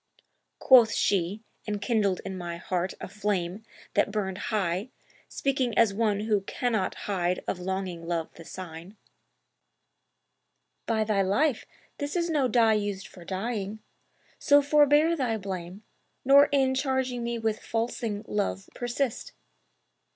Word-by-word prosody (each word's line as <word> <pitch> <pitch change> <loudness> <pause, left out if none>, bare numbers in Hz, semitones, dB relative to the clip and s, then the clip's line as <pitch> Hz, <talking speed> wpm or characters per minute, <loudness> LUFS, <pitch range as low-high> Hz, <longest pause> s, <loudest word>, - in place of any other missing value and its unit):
Quoth 245 -4 +6
she 195 +2 0 0.2
(enkindling 205 -2 0
in 190 - -4
my 175 -2 -5
heart 180 +1 -2
a - - -6
flame 195 -1 -2 0.3
that - - +2
burned 195 -2 -2
high 200 0 -1 0.4
Speaking 260 -4 -1
as 225 -4 +5
one 210 -1 +1
who 210 -2 +1
cannot 220 0 -1
hide 180 -3 -1
of 180 - -2
longing 180 -2 -4
love 170 -2 -2
the 165 - -12
sign), 175 +3 -9 1.9
'By 220 -1 +2
thy 210 -2 +1
life, 220 +8 +1 0.3
this 290 +2 -3
is 340 -1 0
no 285 -5 +2
dye 230 -2 +4
used 205 -2 -2
for 180 - -13
dyeing; 200 +2 -3 0.6
so 285 0 +6
forbear 295 +3 +4
Thy 250 -7 -1
blame, 190 0 -6 0.4
nor 280 +2 +8
in 265 -2 +3
charging 260 -2 -1
me 235 0 -2
with 220 -1 -1
falsing 225 -2 -3
Love 200 -1 -2
persist! 245 - -3
210 Hz, 130 wpm, -27 LUFS, 190-245 Hz, 1.9 s, nor